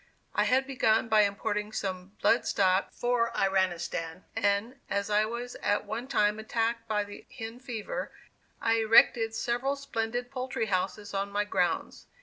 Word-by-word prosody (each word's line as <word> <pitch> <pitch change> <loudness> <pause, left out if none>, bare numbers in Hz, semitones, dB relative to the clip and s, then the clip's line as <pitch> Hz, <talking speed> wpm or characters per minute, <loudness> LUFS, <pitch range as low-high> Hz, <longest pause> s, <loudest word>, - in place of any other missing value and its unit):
I - - +2
had 265 +1 +3
begun 225 -4 +2
by 215 -2 +6
importing 210 +1 -2
some 190 -2 -4
blood 235 - +4
stock 190 0 +2
for 240 -1 0
Iranistan, 175 -3 0
and, 220 +4 0
as 200 +1 -1
I 210 +1 +4
was 240 +2 -5
at 205 - +1
one 235 +4 -4
time 210 -4 +2
attacked 230 +1 -1
by 210 -2 +1
the 205 0 -11
"hen 225 +1 -6
fever," 245 -5 -5 0.5
I 230 0 +2
erected 225 0 +5
several 245 +4 0
splendid 245 -3 -3
poultry 255 -3 -2
houses 200 +1 -2
on 195 0 -1
my 205 +1 +1
grounds. 185 -3 -1
220 Hz, 150 wpm, -29 LUFS, 200-235 Hz, 0.5 s, by